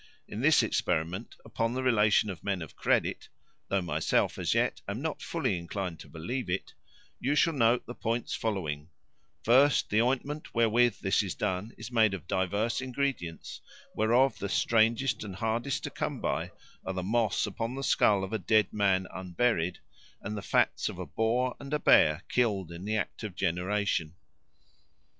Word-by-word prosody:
In -, -, -6 dB
this -, -, +5 dB
experiment, 85 Hz, +7 st, -1 dB
upon 115 Hz, +2 st, -2 dB
the 130 Hz, -, -2 dB
relation 105 Hz, -4 st, +3 dB
of 85 Hz, -4 st, -10 dB
men 100 Hz, -4 st, -1 dB
of 80 Hz, -, -12 dB
credit -, -, 0 dB, 0.4 s
(though 100 Hz, -1 st, 0 dB
myself, 85 Hz, -, 0 dB
as -, -, 0 dB
yet, -, -, +1 dB
am 100 Hz, +3 st, -3 dB
not 160 Hz, +2 st, -3 dB
fully 130 Hz, -, -1 dB
inclined 85 Hz, -1 st, -5 dB
to -, -, -11 dB
believe 90 Hz, +9 st, -4 dB
it), 90 Hz, +2 st, -3 dB, 0.5 s
you 140 Hz, +3 st, 0 dB
shall 165 Hz, +3 st, +3 dB
note 120 Hz, -3 st, +2 dB
the 120 Hz, -, -7 dB
points 115 Hz, 0 st, -2 dB
following: 80 Hz, -8 st, -3 dB, 0.5 s
first, 135 Hz, +5 st, +4 dB
the 110 Hz, +2 st, +4 dB
ointment 135 Hz, +5 st, -2 dB
wherewith 115 Hz, +1 st, +3 dB
this 95 Hz, +2 st, +2 dB
is 95 Hz, -4 st, -4 dB
done 100 Hz, +2 st, -2 dB
is 110 Hz, +2 st, -8 dB
made 110 Hz, -4 st, +3 dB
of 90 Hz, -, -9 dB
divers 100 Hz, +7 st, 0 dB
ingredients, 130 Hz, -, -3 dB, 0.3 s
whereof 120 Hz, +3 st, +3 dB
the 100 Hz, -, -3 dB
strangest 115 Hz, +5 st, +2 dB
and 100 Hz, -3 st, -7 dB
hardest 115 Hz, +5 st, -1 dB
to -, -, -4 dB
come -, -, -3 dB
by -, -, -2 dB, 0.3 s
are 95 Hz, -, -3 dB
the 90 Hz, -1 st, -3 dB
moss 110 Hz, +2 st, +1 dB
upon 115 Hz, +5 st, -4 dB
the 135 Hz, -, -4 dB
skull 100 Hz, -6 st, +3 dB
of 95 Hz, -, -5 dB
a 110 Hz, -, 0 dB
dead 110 Hz, -3 st, +2 dB
man 95 Hz, -3 st, +2 dB
unburied, 90 Hz, 0 st, 0 dB, 0.4 s
and 105 Hz, +2 st, -5 dB
the 105 Hz, -, -4 dB
fats -, -, +1 dB
of -, -, -8 dB
a -, -, -5 dB
boar 120 Hz, +3 st, 0 dB
and 140 Hz, +2 st, -3 dB
a -, -, 0 dB
bear 75 Hz, -, +5 dB
killed 100 Hz, -8 st, 0 dB
in 85 Hz, +3 st, -8 dB
the 110 Hz, +1 st, -1 dB
act -, -, -3 dB
of 105 Hz, -5 st, -6 dB
generation." 90 Hz, -2 st, -1 dB
110 Hz, 175 wpm, -29 LUFS, 95-120 Hz, 0.5 s, this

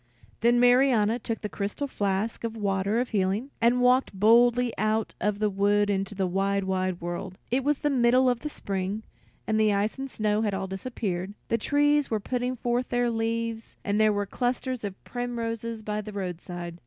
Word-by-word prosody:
Then 240 Hz, +1 st, +4 dB
Marianna 245 Hz, -3 st, +4 dB
took 225 Hz, -1 st, -4 dB
the 210 Hz, -, -2 dB
crystal 205 Hz, +7 st, -3 dB
flask 205 Hz, -3 st, -2 dB
of 230 Hz, -1 st, -2 dB
the 225 Hz, -, -9 dB
water 200 Hz, +2 st, 0 dB
of 245 Hz, -, -1 dB
healing, 205 Hz, +6 st, 0 dB
and 240 Hz, +2 st, +4 dB
walked 250 Hz, -5 st, +3 dB
boldly 240 Hz, +3 st, +5 dB
out 215 Hz, +1 st, 0 dB
of 210 Hz, -1 st, 0 dB
the 210 Hz, 0 st, +1 dB
wood 205 Hz, +1 st, +2 dB
into 195 Hz, +1 st, -2 dB
the 190 Hz, -1 st, 0 dB
wide, 195 Hz, +2 st, 0 dB
wide 185 Hz, -1 st, -1 dB
world. 175 Hz, +2 st, -5 dB
It 260 Hz, +2 st, +1 dB
was 295 Hz, +1 st, +2 dB
the 295 Hz, -, 0 dB
middle 255 Hz, 0 st, +4 dB
of 245 Hz, -2 st, +2 dB
the 300 Hz, -, -4 dB
spring, 195 Hz, -3 st, -3 dB, 0.4 s
the 215 Hz, -1 st, +3 dB
ice 205 Hz, +5 st, 0 dB
and 270 Hz, 0 st, -4 dB
snow 215 Hz, -2 st, 0 dB
had 210 Hz, -3 st, 0 dB
all 195 Hz, 0 st, -2 dB
disappeared; 190 Hz, -1 st, -4 dB
the 230 Hz, -, +2 dB
trees 290 Hz, +3 st, +2 dB
were 220 Hz, -, 0 dB
putting 250 Hz, +3 st, -2 dB
forth 245 Hz, +1 st, -1 dB
their 245 Hz, -1 st, +1 dB
leaves, 230 Hz, 0 st, -2 dB
and 205 Hz, +1 st, +1 dB
there 215 Hz, 0 st, +5 dB
were 205 Hz, 0 st, -1 dB
clusters 250 Hz, +2 st, -2 dB
of 200 Hz, -2 st, -6 dB
primroses 230 Hz, -2 st, -4 dB
by 210 Hz, 0 st, -2 dB
the 215 Hz, 0 st, -8 dB
roadside. 175 Hz, -2 st, -5 dB
220 Hz, 190 wpm, -27 LUFS, 200-245 Hz, 0.4 s, boldly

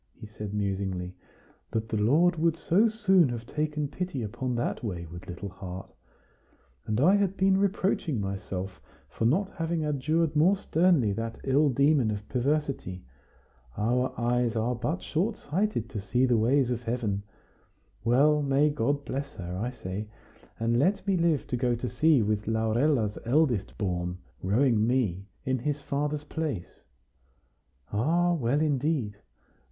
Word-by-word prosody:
he -, -, -8 dB
said 105 Hz, -1 st, -7 dB
musingly 95 Hz, -3 st, -2 dB, 0.6 s
"that 110 Hz, 0 st, -2 dB
the 110 Hz, -, -2 dB
Lord 155 Hz, -, +4 dB
would 165 Hz, 0 st, +2 dB
so 195 Hz, +8 st, +3 dB
soon 190 Hz, -, +3 dB
have 120 Hz, -1 st, -5 dB
taken 150 Hz, +2 st, -2 dB
pity 145 Hz, -3 st, -4 dB
upon 125 Hz, +4 st, -3 dB
that 120 Hz, -, -2 dB
wayward 85 Hz, -4 st, -6 dB
little 90 Hz, +2 st, -6 dB
heart? 95 Hz, 0 st, -8 dB, 0.9 s
And 110 Hz, +1 st, 0 dB
I 180 Hz, +9 st, +5 dB
had 195 Hz, -1 st, 0 dB
been 190 Hz, 0 st, +4 dB
reproaching 190 Hz, -, 0 dB
myself 95 Hz, -1 st, -4 dB, 0.3 s
for 110 Hz, -, -2 dB
not 190 Hz, -, +2 dB
having 165 Hz, -1 st, -1 dB
adjured 155 Hz, +2 st, 0 dB
more 175 Hz, +7 st, +4 dB
sternly 165 Hz, -, +2 dB
that 115 Hz, +2 st, -4 dB
ill 140 Hz, +2 st, +3 dB
demon 140 Hz, -2 st, +3 dB
of 105 Hz, 0 st, -4 dB
perversity. 135 Hz, -, -1 dB, 0.7 s
Our 125 Hz, +4 st, +1 dB
eyes 120 Hz, 0 st, +1 dB
are 115 Hz, +2 st, +1 dB
but 125 Hz, +9 st, -3 dB
short 195 Hz, +8 st, -1 dB
sighted 180 Hz, -, -1 dB
to 105 Hz, -, -4 dB
see 120 Hz, +6 st, +1 dB
the 125 Hz, -2 st, +3 dB
ways 125 Hz, +3 st, +3 dB
of 120 Hz, -1 st, -2 dB
Heaven! 115 Hz, -4 st, -2 dB, 0.8 s
Well, 145 Hz, +6 st, +4 dB
may 145 Hz, +1 st, +3 dB
God 145 Hz, +1 st, -1 dB
bless 140 Hz, +1 st, -4 dB
her, 90 Hz, -1 st, -6 dB
I 110 Hz, +7 st, -2 dB
say, 105 Hz, -4 st, -6 dB, 0.5 s
and 115 Hz, +1 st, +1 dB
let 190 Hz, +9 st, +2 dB
me 195 Hz, -1 st, +2 dB
live 170 Hz, -5 st, +2 dB
to -, -, -2 dB
go 120 Hz, 0 st, +1 dB
to 120 Hz, +2 st, -4 dB
sea 155 Hz, -3 st, +3 dB
with 105 Hz, 0 st, -1 dB
Laurella's 110 Hz, +1 st, +1 dB
eldest 125 Hz, -4 st, +1 dB
born, 90 Hz, -3 st, -2 dB, 0.2 s
rowing 110 Hz, +2 st, +2 dB
me 105 Hz, -7 st, 0 dB, 0.2 s
in 130 Hz, 0 st, 0 dB
his 145 Hz, +4 st, -2 dB
father's 145 Hz, +1 st, -2 dB
place! 150 Hz, -, -4 dB, 1.1 s
Ah! 170 Hz, +11 st, +2 dB
well, 145 Hz, -2 st, +1 dB
indeed! 140 Hz, -7 st, 0 dB
125 Hz, 150 wpm, -28 LUFS, 105-155 Hz, 1.1 s, I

